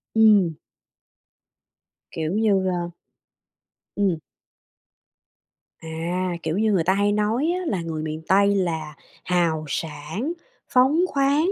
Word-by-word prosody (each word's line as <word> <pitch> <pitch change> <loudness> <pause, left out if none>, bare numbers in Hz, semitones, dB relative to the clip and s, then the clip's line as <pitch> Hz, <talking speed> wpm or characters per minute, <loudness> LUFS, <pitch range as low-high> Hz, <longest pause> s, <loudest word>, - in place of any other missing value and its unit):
Ừm. 210 -6 +5 1.6
Kiểu 160 0 -3
như, 200 -2 +2
a 175 -1 -2 1.1
Ừm. 195 -5 +1 1.6
À, 170 +3 -3
kiểu 160 +2 -1
như, 215 0 +2
người 185 -5 +2
ta 185 +3 +3
hay 200 +1 +2
nói 215 +7 +1
á 370 - -5
là 185 -5 -1
người 160 -2 -4
miền 155 0 -4
Tây 200 +1 +4
là 160 -5 -2 0.3
hào 170 -3 +1
sảng, 160 - -4 0.4
phóng 270 +5 +4
khoáng, 285 +4 +2
185 Hz, 115 wpm, -23 LUFS, 160-215 Hz, 1.6 s, Ừm